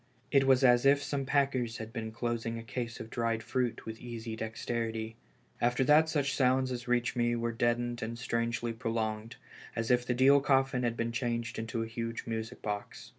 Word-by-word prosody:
It 135 Hz, -1 st, +4 dB
was 135 Hz, 0 st, +5 dB
as 120 Hz, -1 st, +6 dB
if 140 Hz, +1 st, +5 dB
some 135 Hz, -2 st, -2 dB
packers 130 Hz, -5 st, +1 dB
had 110 Hz, 0 st, -7 dB
been. 110 Hz, -2 st, -4 dB
closing 115 Hz, 0 st, -2 dB
a 115 Hz, -, -6 dB
case 115 Hz, 0 st, -5 dB
of 110 Hz, -, -8 dB
dried 115 Hz, -1 st, -1 dB
fruit 120 Hz, +1 st, -1 dB
with 110 Hz, 0 st, -7 dB
easy 115 Hz, -2 st, -6 dB
dexterity. 110 Hz, 0 st, -3 dB, 0.5 s
After 120 Hz, +2 st, +2 dB
that 150 Hz, +3 st, +5 dB
such 140 Hz, -3 st, 0 dB
sounds 130 Hz, 0 st, +2 dB
as 120 Hz, 0 st, -5 dB
reached 120 Hz, +1 st, +1 dB
me 120 Hz, -1 st, +2 dB
were 115 Hz, 0 st, -1 dB
deadened 120 Hz, +1 st, 0 dB
and 115 Hz, +1 st, -4 dB
strangely 115 Hz, 0 st, -1 dB
prolonged, 115 Hz, -1 st, -3 dB, 0.4 s
as 115 Hz, +1 st, -1 dB
if 125 Hz, 0 st, +4 dB
the 125 Hz, 0 st, -1 dB
deal 135 Hz, +3 st, +6 dB
coffin 135 Hz, -2 st, +2 dB
had 120 Hz, -1 st, -1 dB
been 115 Hz, 0 st, -1 dB
changed 120 Hz, -1 st, -2 dB
into 115 Hz, 0 st, -2 dB
a -, -, -5 dB
huge 115 Hz, 0 st, -4 dB
music 115 Hz, +1 st, -5 dB
box. 105 Hz, -1 st, -5 dB
120 Hz, 190 wpm, -31 LUFS, 115-125 Hz, 0.5 s, as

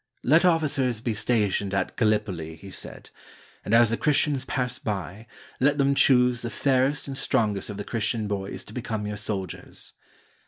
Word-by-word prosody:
"Let 155 Hz, +7 st, +5 dB
officers 145 Hz, -8 st, +2 dB
be 115 Hz, 0 st, -2 dB
stationed 105 Hz, -3 st, 0 dB
at 95 Hz, -1 st, -1 dB
Gallipoli," 105 Hz, -8 st, 0 dB
he 95 Hz, +4 st, -12 dB
said, -, -, -10 dB, 0.5 s
"and -, -, -5 dB
as 115 Hz, 0 st, +5 dB
the 115 Hz, -, 0 dB
Christians 145 Hz, -2 st, +1 dB
pass 125 Hz, 0 st, -2 dB
by, 105 Hz, -3 st, -5 dB, 0.3 s
let 145 Hz, +2 st, +3 dB
them 140 Hz, -1 st, +3 dB
choose 125 Hz, -3 st, +4 dB
the 120 Hz, -, -3 dB
fairest 135 Hz, +4 st, +1 dB
and 135 Hz, -, -5 dB
strongest 110 Hz, -8 st, 0 dB
of 105 Hz, -, -6 dB
the 105 Hz, -, -4 dB
Christian 110 Hz, -1 st, -2 dB
boys 100 Hz, -1 st, -4 dB
to 105 Hz, -, -13 dB
become 115 Hz, -3 st, -3 dB
your 105 Hz, 0 st, -4 dB
soldiers." 100 Hz, -4 st, -4 dB
115 Hz, 165 wpm, -26 LUFS, 105-130 Hz, 0.5 s, Let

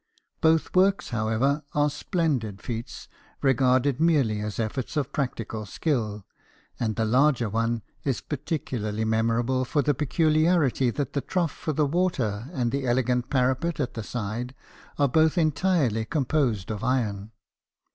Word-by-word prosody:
Both 160 Hz, +2 st, +2 dB
works, 190 Hz, +2 st, +3 dB
however, 120 Hz, +6 st, 0 dB
are 145 Hz, 0 st, +3 dB
splen 160 Hz, -2 st, 0 dB
did 105 Hz, -3 st, -7 dB
feats, 115 Hz, -1 st, -6 dB, 0.4 s
regarded 130 Hz, 0 st, +3 dB
merely 140 Hz, -11 st, +3 dB
as 105 Hz, -1 st, -4 dB
efforts 115 Hz, +6 st, -3 dB
of 140 Hz, -2 st, -1 dB
practical 115 Hz, -6 st, -3 dB
skill; 110 Hz, -, -2 dB, 0.5 s
and 110 Hz, -3 st, -1 dB
the 115 Hz, -, 0 dB
larger 125 Hz, +1 st, +3 dB
one 115 Hz, +1 st, -1 dB, 0.2 s
is 135 Hz, -4 st, 0 dB
particularly 125 Hz, -, -3 dB
memor 115 Hz, +1 st, +2 dB
able 130 Hz, +1 st, 0 dB
for 145 Hz, +3 st, 0 dB
the 145 Hz, -, +2 dB
peculiarity 155 Hz, -1 st, +2 dB
that 140 Hz, +2 st, -3 dB
the 140 Hz, -, 0 dB
trough 175 Hz, -2 st, -1 dB
for 155 Hz, -, -4 dB
the 150 Hz, +1 st, +2 dB
water 135 Hz, -, -1 dB
and 125 Hz, -8 st, -1 dB
the 135 Hz, -1 st, -2 dB
elegant 125 Hz, 0 st, +1 dB
parapet 135 Hz, +5 st, +1 dB
at 130 Hz, -3 st, -1 dB
the 115 Hz, -, -4 dB
side 120 Hz, +3 st, -4 dB, 0.4 s
are 145 Hz, -, +3 dB
both 160 Hz, +5 st, +3 dB
entirely 155 Hz, -, +2 dB
composed 130 Hz, -, 0 dB
of 105 Hz, -1 st, -5 dB
iron. 110 Hz, -5 st, -1 dB
130 Hz, 145 wpm, -26 LUFS, 115-150 Hz, 0.5 s, works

